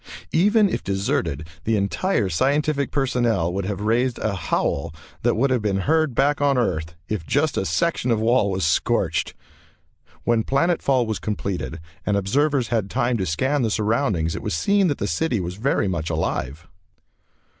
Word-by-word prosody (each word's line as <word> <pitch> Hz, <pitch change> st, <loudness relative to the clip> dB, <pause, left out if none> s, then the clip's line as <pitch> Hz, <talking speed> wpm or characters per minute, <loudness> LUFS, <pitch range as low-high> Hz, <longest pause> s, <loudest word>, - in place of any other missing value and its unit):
Even 205 Hz, +5 st, +4 dB
if -, -, -3 dB
deserted, 85 Hz, -6 st, -1 dB, 0.2 s
the 115 Hz, -, +1 dB
entire 105 Hz, -, 0 dB
scientific 140 Hz, -, +1 dB
personnel 120 Hz, -, 0 dB
would 95 Hz, 0 st, -2 dB
have 100 Hz, 0 st, -3 dB
raised 120 Hz, +3 st, +1 dB
a 110 Hz, -, -1 dB
howl 85 Hz, -4 st, -1 dB, 0.3 s
that -, -, +2 dB
would 130 Hz, +4 st, +1 dB
have 125 Hz, -3 st, +2 dB
been 100 Hz, -2 st, 0 dB
heard 155 Hz, 0 st, +1 dB
back 145 Hz, +3 st, +2 dB
on 140 Hz, -2 st, +3 dB
Earth 85 Hz, -8 st, -1 dB
if 105 Hz, -6 st, -3 dB
just 145 Hz, -, +1 dB
a 95 Hz, -, 0 dB
section 170 Hz, -7 st, 0 dB
of 115 Hz, -2 st, +2 dB
wall 110 Hz, -2 st, +3 dB
was 95 Hz, -3 st, -1 dB
scorched. 80 Hz, -, 0 dB, 0.9 s
When 120 Hz, -1 st, +2 dB
planet 170 Hz, +8 st, +1 dB
fall 130 Hz, -3 st, +2 dB
was 110 Hz, -1 st, -3 dB
completed 90 Hz, -, -3 dB, 0.2 s
and 105 Hz, -1 st, +1 dB
observers 135 Hz, +6 st, +1 dB
had 110 Hz, -5 st, 0 dB
time 120 Hz, +4 st, 0 dB
to 95 Hz, -3 st, -2 dB
scan 130 Hz, -, 0 dB
the 115 Hz, -, +1 dB
surroundings 105 Hz, -, 0 dB
it -, -, -5 dB
was -, -, -2 dB
seen 200 Hz, -, +2 dB
that 145 Hz, -, 0 dB
the -, -, -2 dB
city 160 Hz, -9 st, 0 dB
was 90 Hz, -1 st, -4 dB
very 115 Hz, -2 st, +1 dB
much 85 Hz, -3 st, -2 dB
alive. 80 Hz, -1 st, -3 dB
110 Hz, 175 wpm, -23 LUFS, 95-140 Hz, 0.9 s, Even